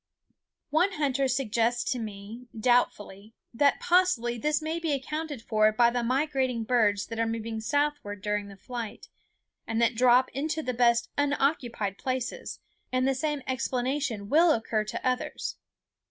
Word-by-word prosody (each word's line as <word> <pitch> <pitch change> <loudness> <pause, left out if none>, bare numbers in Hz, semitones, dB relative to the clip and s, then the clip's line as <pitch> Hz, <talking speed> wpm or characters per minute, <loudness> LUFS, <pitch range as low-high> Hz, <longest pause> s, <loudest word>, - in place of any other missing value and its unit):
One 355 +6 +3
hunter 275 -3 +1
suggests 240 -2 0
to 250 - -1
me, 215 +3 -8
doubtfully, 215 -3 0 0.2
that 280 +4 +3
possibly 350 -10 +2
this 300 +6 0
may 320 +1 -3
be 325 -3 -1
accounted 290 -1 -4
for 215 -1 +3
by 235 +2 +4
the 245 0 -1
migrating 260 -1 0
birds 215 -4 +2
that 230 -1 -6
are 230 - +1
moving 225 0 -4
southward 285 -6 -1
during 210 -1 -1
the 200 -1 -12
flight, 235 0 -7 0.6
and 225 0 -1
that 235 +1 +3
drop 250 +2 +4
into 310 +4 -2
the 255 - -2
best 235 0 +3
unoccupied 270 -8 0
places; 255 -2 -3 0.3
and 255 +1 +1
the 270 - +3
same 295 +1 -2
explanation 255 -3 -2
will 325 +7 +5
occur 220 -1 -1
to 215 - -4
others. 255 0 -2
245 Hz, 150 wpm, -28 LUFS, 225-285 Hz, 0.6 s, will